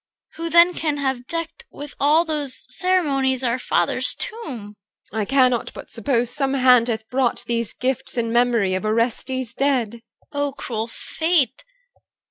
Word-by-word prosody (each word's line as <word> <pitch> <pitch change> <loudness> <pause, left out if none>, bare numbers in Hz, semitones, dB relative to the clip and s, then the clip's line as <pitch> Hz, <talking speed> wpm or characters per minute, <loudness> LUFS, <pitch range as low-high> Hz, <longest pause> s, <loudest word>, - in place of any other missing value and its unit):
Who 330 +1 -3
then 340 +2 +6
can 305 -4 -1
have 265 -3 -2
decked 330 +7 -4
With 290 0 -8
all 305 +4 +4
those 295 -5 -2
ceremonies 275 -9 +3
our 245 0 0
father's - - 0
tomb? 280 - -5 0.4
EL. 220 - -2
I 210 - 0
cannot 255 -1 +2
but - - -10
suppose 240 +1 0
some 275 -1 0
hand 250 -3 +5
hath 220 -2 -3
brought 255 -1 0
These 230 -1 -2
gifts 265 0 -3
in 230 -1 -1
memory 235 -5 +2
of 185 - -2
Orestes 235 +3 -1
dead. 250 -5 0 0.3
CHR. - - -7
O 285 -1 -1
cruel 230 -5 -4
fate! 315 +1 0
260 Hz, 155 wpm, -22 LUFS, 235-290 Hz, 0.4 s, then